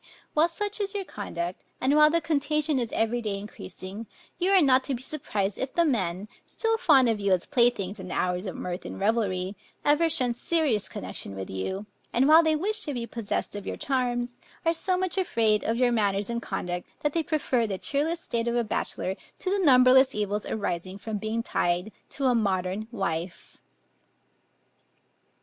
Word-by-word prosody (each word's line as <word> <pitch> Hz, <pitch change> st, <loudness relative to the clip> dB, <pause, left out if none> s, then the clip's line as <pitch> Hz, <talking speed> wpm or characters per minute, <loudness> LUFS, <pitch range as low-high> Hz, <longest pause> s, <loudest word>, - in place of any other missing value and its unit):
While 310 Hz, +2 st, +4 dB
such 410 Hz, +5 st, -3 dB
is 400 Hz, 0 st, -2 dB
your 400 Hz, -, -1 dB
conduct, 180 Hz, -, -5 dB, 0.2 s
and 270 Hz, +3 st, +2 dB
while 300 Hz, 0 st, +7 dB
the 335 Hz, +2 st, +2 dB
contagion 300 Hz, -2 st, +1 dB
is 235 Hz, -2 st, -2 dB
every 225 Hz, +2 st, 0 dB
day 210 Hz, -3 st, -2 dB
increasing, 200 Hz, +1 st, -8 dB, 0.3 s
you 365 Hz, +1 st, +2 dB
are 390 Hz, -1 st, +6 dB
not 260 Hz, -5 st, +4 dB
to 275 Hz, -, -1 dB
be 240 Hz, -, -7 dB
surprised 210 Hz, -10 st, -2 dB
if 265 Hz, -, -3 dB
the 340 Hz, -, +4 dB
men, 195 Hz, -, -1 dB, 0.2 s
still 450 Hz, -1 st, 0 dB
fond 275 Hz, -, +5 dB
of 225 Hz, -2 st, +1 dB
you 200 Hz, -1 st, 0 dB
as 180 Hz, -, +1 dB
playthings 235 Hz, -7 st, +1 dB
in 185 Hz, -, -7 dB
the 180 Hz, -, -4 dB
hours 180 Hz, +2 st, -1 dB
of 185 Hz, -, -5 dB
mirth 180 Hz, +1 st, -4 dB
and -, -, -7 dB
revelry, 195 Hz, -3 st, 0 dB, 0.3 s
ever 300 Hz, +3 st, +4 dB
shun 250 Hz, -5 st, +1 dB
serious 245 Hz, -, 0 dB
connection 95 Hz, +1 st, -6 dB
with 95 Hz, 0 st, -6 dB
you; 190 Hz, -, -3 dB, 0.3 s
and 255 Hz, +3 st, +4 dB
while 315 Hz, +2 st, +8 dB
they 315 Hz, -1 st, +2 dB
wish 420 Hz, +7 st, +1 dB
to 290 Hz, -3 st, -3 dB
be 235 Hz, -1 st, -3 dB
possessed 230 Hz, -3 st, -3 dB
of 205 Hz, -1 st, -6 dB
your -, -, -3 dB
charms, 245 Hz, -2 st, -1 dB, 0.3 s
are 330 Hz, -, +4 dB
so 365 Hz, +2 st, 0 dB
much 375 Hz, 0 st, 0 dB
afraid 225 Hz, -, +2 dB
of 225 Hz, +1 st, 0 dB
your 250 Hz, -1 st, +3 dB
manners 205 Hz, -2 st, +1 dB
and 235 Hz, 0 st, -2 dB
conduct, 180 Hz, -4 st, -4 dB
that 295 Hz, -1 st, 0 dB
they 335 Hz, -, +2 dB
prefer 285 Hz, -7 st, 0 dB
the 195 Hz, -2 st, -3 dB
cheerless 310 Hz, -, -1 dB
state 230 Hz, 0 st, -2 dB
of 235 Hz, -, 0 dB
a 240 Hz, -, +2 dB
bachelor, 190 Hz, -3 st, -2 dB, 0.2 s
to 370 Hz, -, -3 dB
the 395 Hz, -1 st, +1 dB
numberless 260 Hz, -2 st, +6 dB
evils 210 Hz, 0 st, -2 dB
arising 185 Hz, -3 st, -3 dB
from 210 Hz, +1 st, -4 dB
being 220 Hz, +2 st, -2 dB
tied 175 Hz, 0 st, 0 dB, 0.2 s
to 275 Hz, -, -3 dB
a 255 Hz, -, +4 dB
modern 195 Hz, -1 st, 0 dB
wife. 175 Hz, -5 st, -4 dB
235 Hz, 190 wpm, -27 LUFS, 200-295 Hz, 0.3 s, while